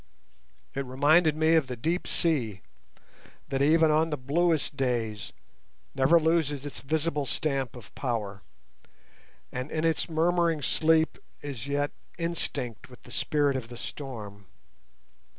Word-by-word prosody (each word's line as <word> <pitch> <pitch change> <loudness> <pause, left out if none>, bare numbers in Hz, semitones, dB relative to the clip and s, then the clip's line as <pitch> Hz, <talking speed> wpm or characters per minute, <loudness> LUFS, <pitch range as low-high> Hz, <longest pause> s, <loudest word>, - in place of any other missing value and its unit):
It 135 - -2
reminded 150 +5 +4
me 160 +1 +4
of 160 -5 +4
the 125 - -4
deep 165 +10 -1
sea, 120 - +1 0.9
that 135 -1 0
even 160 +2 +5
on 160 +2 +3
the 150 - -2
bluest 155 +4 +1
days 115 -6 -1 0.6
never 135 +5 +5
loses 155 -4 +1
its 145 - -6
visible 150 0 -1
stamp 135 -5 -1
of 120 -5 -12
power, 105 -6 -3 1.1
and 125 +3 -4
in 155 +1 -1
its 165 +1 +1
murmuring 165 -1 +2
sleep 160 +2 +2 0.2
is 135 -4 -5
yet 145 +1 0 0.3
instinct 165 -10 -3
with 125 - -15
the - - -14
spirit 145 -2 +1
of 130 -3 -3
the 120 0 -10
storm. 105 -9 -7
145 Hz, 135 wpm, -28 LUFS, 125-160 Hz, 1.1 s, even